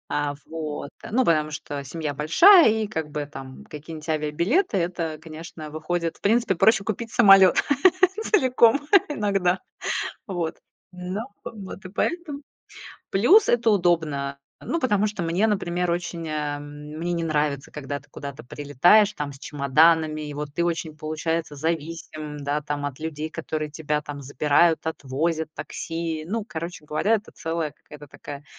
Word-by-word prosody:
А, 145 Hz, 0 st, -1 dB
вот, 155 Hz, -3 st, -5 dB
э, -, -, -7 dB
ну 255 Hz, +4 st, +3 dB
потому 155 Hz, -2 st, +2 dB
что 145 Hz, -2 st, -5 dB
семья 150 Hz, +1 st, -4 dB
большая, 320 Hz, -, +7 dB
и 220 Hz, 0 st, 0 dB
как 160 Hz, -7 st, -4 dB
бы 150 Hz, 0 st, -3 dB
там 135 Hz, -2 st, -10 dB
какие-нибудь 155 Hz, +1 st, -9 dB
авиабилеты 170 Hz, -, +1 dB
это, 170 Hz, -3 st, -2 dB
конечно, 160 Hz, -1 st, -9 dB
выходит 165 Hz, +2 st, -3 dB
в -, -, -31 dB
принципе 225 Hz, -1 st, +2 dB
проще 220 Hz, +3 st, +4 dB
купить 225 Hz, +2 st, -4 dB
самолёт 195 Hz, -5 st, +7 dB, 0.7 s
целиком 260 Hz, -, +4 dB, 0.3 s
иногда. 195 Hz, -8 st, +1 dB, 0.7 s
Вот, 175 Hz, -5 st, -3 dB, 0.3 s
ну 180 Hz, +3 st, -5 dB, 0.2 s
в -, -, -6 dB
вот 190 Hz, +1 st, -9 dB
и -, -, -6 dB
поэтому. 295 Hz, -, -2 dB, 0.7 s
Плюс 365 Hz, -, +5 dB
это 235 Hz, -1 st, +3 dB
удобно. 160 Hz, -8 st, +1 dB, 0.2 s
Ну 335 Hz, -, -2 dB
потому 210 Hz, -6 st, +2 dB
что 210 Hz, -3 st, -3 dB
мне, 170 Hz, +6 st, +1 dB
например, 180 Hz, -4 st, 0 dB
очень, 170 Hz, -1 st, -3 dB
э, 150 Hz, -1 st, -2 dB
мне 150 Hz, +3 st, -6 dB
не 170 Hz, -1 st, -1 dB
нравится, 150 Hz, -3 st, -1 dB
когда 145 Hz, -1 st, -5 dB
ты -, -, -24 dB
куда-то 140 Hz, +1 st, -8 dB
прилетаешь 145 Hz, -, +4 dB
там 145 Hz, -5 st, -5 dB
с 135 Hz, -, -13 dB
чемоданами. 155 Hz, +3 st, +3 dB
И 150 Hz, -1 st, -6 dB
вот 145 Hz, 0 st, -6 dB
ты 170 Hz, -, +1 dB
очень, 165 Hz, -2 st, -2 dB
получается, 155 Hz, +1 st, -3 dB
зависим, 155 Hz, -1 st, -4 dB
да, 145 Hz, +1 st, -2 dB
там 145 Hz, -1 st, -3 dB
от 140 Hz, -2 st, -6 dB
людей, 155 Hz, -1 st, -4 dB
которые 155 Hz, 0 st, -4 dB
тебя 150 Hz, 0 st, -2 dB
там 145 Hz, -1 st, -8 dB
забирают, 150 Hz, +5 st, +2 dB
отвозят, 160 Hz, +2 st, -2 dB
такси. 165 Hz, -1 st, -4 dB
Ну 220 Hz, +4 st, -2 dB
короче 165 Hz, 0 st, -6 dB
говоря, 155 Hz, +9 st, +1 dB
это 215 Hz, -, -10 dB
целая 165 Hz, -2 st, -3 dB
какая-то 150 Hz, 0 st, -14 dB
такая 145 Hz, +1 st, -9 dB
160 Hz, 155 wpm, -24 LUFS, 150-185 Hz, 0.7 s, большая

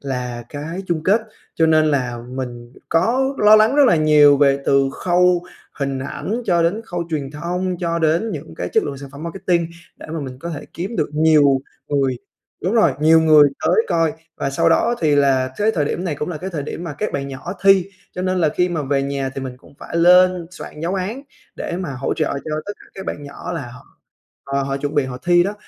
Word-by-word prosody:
là 125 Hz, -3 st, -4 dB
cái 160 Hz, +6 st, -6 dB
chung 165 Hz, -3 st, -1 dB
kết, 205 Hz, +5 st, +4 dB, 0.3 s
cho 160 Hz, -, +3 dB
nên 155 Hz, -1 st, +4 dB
là 125 Hz, -5 st, 0 dB
mình 120 Hz, -2 st, -6 dB, 0.2 s
có 255 Hz, +11 st, +1 dB
lo 210 Hz, +1 st, +7 dB
lắng 220 Hz, +6 st, +4 dB
rất 290 Hz, -, +6 dB
là 175 Hz, -, +4 dB
nhiều, 150 Hz, -2 st, +6 dB
về 140 Hz, -1 st, +3 dB
từ 135 Hz, -1 st, +3 dB
khâu 180 Hz, 0 st, +2 dB, 0.4 s
hình 140 Hz, -2 st, -2 dB
ảnh 210 Hz, -, -4 dB
cho 170 Hz, -3 st, +3 dB
đến 185 Hz, +7 st, 0 dB
khâu 175 Hz, -5 st, -4 dB
truyền 140 Hz, -3 st, -3 dB
thông, 180 Hz, +4 st, -3 dB
cho 170 Hz, -2 st, -1 dB
đến 165 Hz, +7 st, +1 dB
những 140 Hz, -, -7 dB
cái 90 Hz, -, -3 dB
chất -, -, +3 dB
lượng 140 Hz, -2 st, -5 dB
sản 140 Hz, -, -9 dB
phẩm 140 Hz, +2 st, -10 dB
marketing 170 Hz, -1 st, -1 dB, 0.3 s
để -, -, -11 dB
mà 160 Hz, -, -3 dB
mình 130 Hz, -2 st, -7 dB
có 170 Hz, +5 st, -6 dB
thể 150 Hz, -, -6 dB
kiếm 190 Hz, +7 st, -4 dB
được 155 Hz, -4 st, 0 dB
nhiều 150 Hz, -3 st, +4 dB, 0.3 s
người 135 Hz, -3 st, +1 dB, 0.5 s
đúng 190 Hz, +6 st, 0 dB
rồi, 170 Hz, -, +4 dB
nhiều 160 Hz, +1 st, +6 dB
người 155 Hz, -2 st, +6 dB, 0.2 s
tới -, -, +3 dB
coi. 165 Hz, -2 st, +1 dB, 0.2 s
Và 140 Hz, -, -2 dB
sau 165 Hz, +4 st, +2 dB
đó 235 Hz, +8 st, +3 dB
thì 155 Hz, -3 st, +3 dB
là 130 Hz, -2 st, +2 dB
thới 210 Hz, +2 st, +2 dB
thời 155 Hz, -9 st, 0 dB
điểm 175 Hz, +5 st, -3 dB
này 165 Hz, -, -1 dB
cũng 150 Hz, +3 st, -4 dB
là 175 Hz, -, -4 dB
cái 190 Hz, +3 st, -5 dB
thời 155 Hz, -5 st, -4 dB
điểm 165 Hz, +4 st, -6 dB
mà 165 Hz, -, -5 dB
các 210 Hz, -, -2 dB
bạn 140 Hz, 0 st, -3 dB
nhỏ 135 Hz, +6 st, -6 dB
thi, 195 Hz, -2 st, +5 dB, 0.3 s
cho 180 Hz, -, -5 dB
nên 185 Hz, 0 st, 0 dB
là 160 Hz, -3 st, +3 dB
khi 180 Hz, +4 st, 0 dB
mà 165 Hz, -3 st, -2 dB
về 135 Hz, 0 st, 0 dB
nhà 140 Hz, -1 st, -2 dB
thì -, -, -4 dB
mình 130 Hz, -1 st, -6 dB
cũng 140 Hz, -, -20 dB
phải -, -, -6 dB
lên 180 Hz, 0 st, +5 dB
soạn 155 Hz, -3 st, -10 dB
giáo 170 Hz, +3 st, -2 dB
án 205 Hz, +8 st, -3 dB, 0.3 s
để 170 Hz, -, -4 dB
mà 180 Hz, -6 st, -4 dB
hỗ 130 Hz, +1 st, -2 dB
trợ 155 Hz, -, 0 dB, 0.2 s
cho -, -, -5 dB, 0.2 s
tất 205 Hz, -, -3 dB
cả -, -, -15 dB
các 190 Hz, -, -8 dB
bạn 145 Hz, -, -4 dB
nhỏ, 145 Hz, +4 st, -7 dB
là 165 Hz, -4 st, -3 dB
họ 125 Hz, -, -13 dB, 0.6 s
họ 140 Hz, 0 st, -1 dB
họ 135 Hz, 0 st, -2 dB
chuẩn 145 Hz, +1 st, -4 dB
bị 145 Hz, -2 st, +2 dB
họ 130 Hz, -1 st, -6 dB
thi 175 Hz, 0 st, +5 dB
đó. 200 Hz, +3 st, -2 dB
160 Hz, 235 wpm, -20 LUFS, 140-180 Hz, 0.6 s, lo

